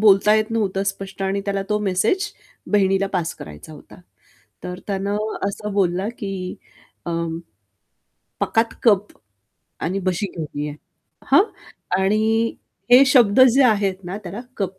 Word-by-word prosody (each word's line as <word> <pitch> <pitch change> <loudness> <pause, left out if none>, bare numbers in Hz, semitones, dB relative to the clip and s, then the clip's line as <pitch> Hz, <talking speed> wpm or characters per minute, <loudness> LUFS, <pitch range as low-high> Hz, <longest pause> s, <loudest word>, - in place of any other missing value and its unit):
बोलता 210 0 +6
येत 215 +1 +1
नव्हतं 200 -4 0
स्पष्ट 195 -1 -4
आणि 195 +1 0
त्याला 200 -1 -1
तो 210 - +2
मेसेज 215 - 0 0.4
बहिणीला 195 -1 +3
पास 175 -4 -1
करायचा 75 - -11
होता. 150 - -14 0.6
तर 180 0 -5
त्यानं 200 0 -1 0.3
असं 210 +1 -5
बोलला 190 0 +1
की 195 -2 -4 0.5
अं, 165 -1 -2 1.0
"पकात 225 0 +1
कप 210 -3 +4 0.8
आणि 185 +4 -1
बशी 185 +2 -1
घेऊन 155 -3 -5
या." 150 0 -4 0.6
हं. - - +7 0.5
आणि 220 +4 +1 0.4
हे 250 +2 +9
शब्द 245 -5 +5
जे 275 +1 +5
आहेत 200 -5 +2
ना, 180 +3 -5
त्याला 195 0 -7 0.2
तो 200 - +2
195 Hz, 135 wpm, -21 LUFS, 185-215 Hz, 1.0 s, हे